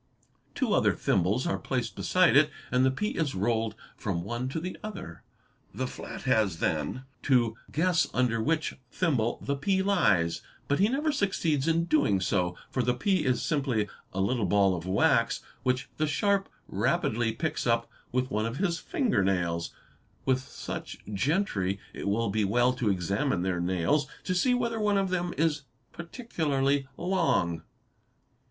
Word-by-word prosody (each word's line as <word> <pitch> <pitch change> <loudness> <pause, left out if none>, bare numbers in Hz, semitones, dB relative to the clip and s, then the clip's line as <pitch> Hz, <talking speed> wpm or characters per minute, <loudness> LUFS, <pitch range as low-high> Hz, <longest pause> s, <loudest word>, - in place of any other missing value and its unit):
Two - - +1
other - - +4
thimbles 100 +8 +1
are 170 - 0
placed 125 -3 -2
beside 185 -5 +3
it 150 +1 +6 0.2
and 125 0 +3
the 130 - +5
pea 210 - -1
is 155 -5 -1
rolled 110 +2 0 0.2
from 90 -5 -3
one 120 +6 -3
to 150 - -3
the 180 +3 -5
other. 200 - -7 0.5
The 130 - -1
flat - - -7
has 110 -9 +2
then 80 - -1 0.2
to 120 -5 +2 0.2
guess 170 +2 +2
under 120 -3 +1
which 155 +4 0 0.2
thimble 125 -9 0
the 140 - -1
pea 190 +7 +1
lies, 100 - +2 0.3
but 140 - +1
he 205 +3 +4
never 295 +5 +1
succeeds 165 - 0
in 165 +1 +2
doing 145 - +3
so, 90 -1 0 0.2
for 130 - 0
the 125 +1 +1
pea 185 +6 +1
is 125 -2 +1
simply 135 -9 0 0.2
a 95 - -4
little 105 +1 +1
ball 100 0 +3
of 85 +1 -6
wax 95 +2 +2 0.2
which 125 +1 0
the 155 - +1
sharp 200 +5 +1 0.2
rapidly 115 0 +1
picks 155 +1 -2
up 115 0 +2 0.2
with 125 +1 0
one 110 0 0
of 115 +3 -5
his 175 -3 0
fingernails. 95 - 0 0.5
~With 130 -1 +3
such 130 - -7 0.2
gentry 100 - 0
it - - -5
will 105 +1 +1
be 110 +1 +1
well 120 +5 +3
to 125 -4 0
examine 100 - 0
their 95 -2 0
nails 90 - +1 0.2
to 185 - -1
see 250 +8 +3
whether 235 -2 -1
one 210 -1 +2
of 195 -1 +1
them 175 -1 0
is 155 -2 +1 0.3
particularly 145 - -1
long. 170 - +1
130 Hz, 160 wpm, -28 LUFS, 100-165 Hz, 0.5 s, it